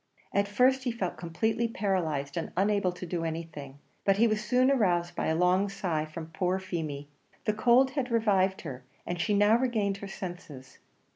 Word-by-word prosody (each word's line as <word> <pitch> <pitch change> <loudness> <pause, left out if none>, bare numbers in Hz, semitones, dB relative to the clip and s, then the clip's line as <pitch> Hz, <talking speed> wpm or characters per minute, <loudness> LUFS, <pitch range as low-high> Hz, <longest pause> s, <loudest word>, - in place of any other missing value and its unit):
At 200 0 +2
first 255 +6 +3
he 245 - +1
felt 195 -6 -3
completely 220 +7 -1
paralysed, 170 -10 -1
and 165 - -3
unable 200 -1 +2
to 180 +1 -8
do 170 -1 -3
anything; 160 -4 -6 0.3
but 195 -1 +3
he 230 - +5
was 215 -1 +1
soon 250 +4 +3
aroused 175 -9 +1
by - - -1
a 160 - +1
long 180 +4 +3
sigh 175 -6 -2
from 160 +1 -8
poor 180 +2 0
Feemy. 160 -6 -4 0.4
The 215 - +2
cold 245 +4 +4
had 265 -2 -2
revived 195 -5 +2
her, 130 -5 -7 0.2
and 175 -1 -3
she 205 +5 +1
now 205 +3 +5
regained 215 -6 0
her 200 - -7
senses. 175 -9 -8
190 Hz, 185 wpm, -29 LUFS, 165-215 Hz, 0.4 s, he